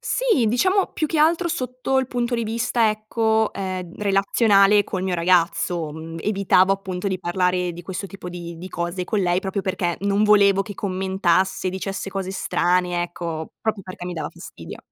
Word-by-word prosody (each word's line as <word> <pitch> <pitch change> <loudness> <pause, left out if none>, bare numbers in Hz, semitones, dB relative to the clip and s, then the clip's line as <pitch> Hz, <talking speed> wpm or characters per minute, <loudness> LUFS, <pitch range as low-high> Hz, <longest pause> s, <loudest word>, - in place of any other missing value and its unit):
Sì, - - +1
diciamo 370 - +2
più 310 - -1
che 320 - -1
altro 335 +3 +3
sotto 255 -1 -1
il 260 - 0
punto 240 -1 -1
di 230 - -1
vista, 230 +1 +1
ecco, 220 +1 0
ehm, 185 -3 -5
relazionale 200 0 +4
col 185 -1 -4
mio 185 -1 -1
ragazzo, 170 -1 +1
mhmm, 160 +1 -8
evitavo 195 -1 +3
appunto 190 -1 -3
di 190 -1 -2
parlare 180 0 0
di 175 - -9
questo 190 +2 -5
tipo 195 -2 -9
di 170 -1 -7
di 180 +3 -8
cose 175 +1 -3
con 210 +4 -1
lei, 180 -1 +1
proprio 195 +1 -2
perché 185 -3 -1
non 200 +1 +2
volevo 200 -2 +5
che 205 0 -8
commentasse, 190 -1 0
dicesse 195 +1 -4
cose 190 -1 -3
strane, 180 -2 0
ecco, 170 -2 -5
proprio 215 -3 -2
perché 185 -1 -9
mi 180 - -4
dava 160 - -4
fastidio. - - -10
195 Hz, 175 wpm, -22 LUFS, 180-215 Hz, -, volevo